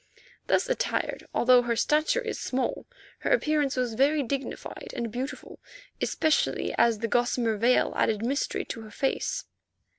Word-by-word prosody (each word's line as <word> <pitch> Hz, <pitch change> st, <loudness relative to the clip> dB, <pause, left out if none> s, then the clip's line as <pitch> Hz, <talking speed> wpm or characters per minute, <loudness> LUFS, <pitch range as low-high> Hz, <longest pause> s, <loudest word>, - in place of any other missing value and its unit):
Thus -, -, +2 dB
attired, -, -, -2 dB
although 250 Hz, 0 st, +5 dB
her 240 Hz, -1 st, -1 dB
stature 305 Hz, -, +2 dB
is 455 Hz, -2 st, -4 dB
small, 265 Hz, -, -2 dB, 0.3 s
her -, -, -2 dB
appearance 305 Hz, -, +2 dB
was 250 Hz, -3 st, -1 dB
very 280 Hz, +5 st, +3 dB
dignified 270 Hz, +2 st, -5 dB
and 230 Hz, -2 st, -3 dB
beautiful, 255 Hz, +5 st, -6 dB, 0.4 s
especially 315 Hz, -1 st, +1 dB
as 230 Hz, -2 st, +3 dB
the 230 Hz, +2 st, -2 dB
gossamer 240 Hz, -1 st, +1 dB
veil 235 Hz, +4 st, +3 dB
added 220 Hz, 0 st, +1 dB
mystery 275 Hz, +4 st, -1 dB
to 230 Hz, -, -6 dB
her 220 Hz, -, -10 dB
face. 390 Hz, -, -2 dB
255 Hz, 145 wpm, -27 LUFS, 235-300 Hz, 0.4 s, although